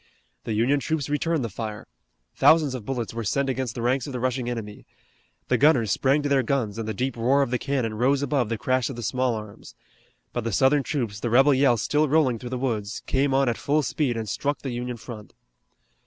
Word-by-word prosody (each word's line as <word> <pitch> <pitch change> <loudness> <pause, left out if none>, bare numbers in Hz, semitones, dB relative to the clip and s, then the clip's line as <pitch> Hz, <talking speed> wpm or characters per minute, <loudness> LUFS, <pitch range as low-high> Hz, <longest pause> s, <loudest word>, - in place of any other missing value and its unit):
The 110 - -2
Union 120 +7 +2
troops 155 0 -2
returned 155 0 0
the - - -1
fire. 110 +1 -6 0.5
Thousands 155 -4 +4
of 125 -5 -6
bullets 120 -5 -3
were 115 0 -4
sent 140 +6 0
against 130 -3 -3
the 115 - -4
ranks 125 +2 +1
of 140 - -6
the 125 - -3
rushing 125 0 -1
enemy. 110 -4 -6 0.6
The - - +1
gunners 130 - +4
sprang 140 - +2
to - - 0
their 140 -1 +3
guns 115 -4 -1
and 110 - -4
the 110 - -2
deep 130 +3 -2
roar 130 +5 +3
of 130 - -4
the 125 - 0
cannon 130 -6 -1
rose 135 +5 +1
above 130 -5 0
the 115 - -1
crash 130 +1 0
of 135 - -6
the 120 - -6
small 125 +2 0
arms. 105 -2 -10 0.6
But 120 - -2
the 115 - -2
Southern 135 +8 +3
troops, 120 -8 -3
the 120 - -2
rebel 135 +5 +5
yell 130 -3 +3
still 150 +7 +1
rolling 135 -6 +2
through 120 - -7
the 130 - -3
woods, 110 -5 -3
came 135 +1 +1
on 135 0 +3
at 120 - 0
full 150 +1 +1
speed 130 -5 -1
and 110 -1 -4
struck 145 +7 -2
the 135 - -3
Union 120 0 -4
front. 110 -2 -10
125 Hz, 230 wpm, -25 LUFS, 115-140 Hz, 0.6 s, rebel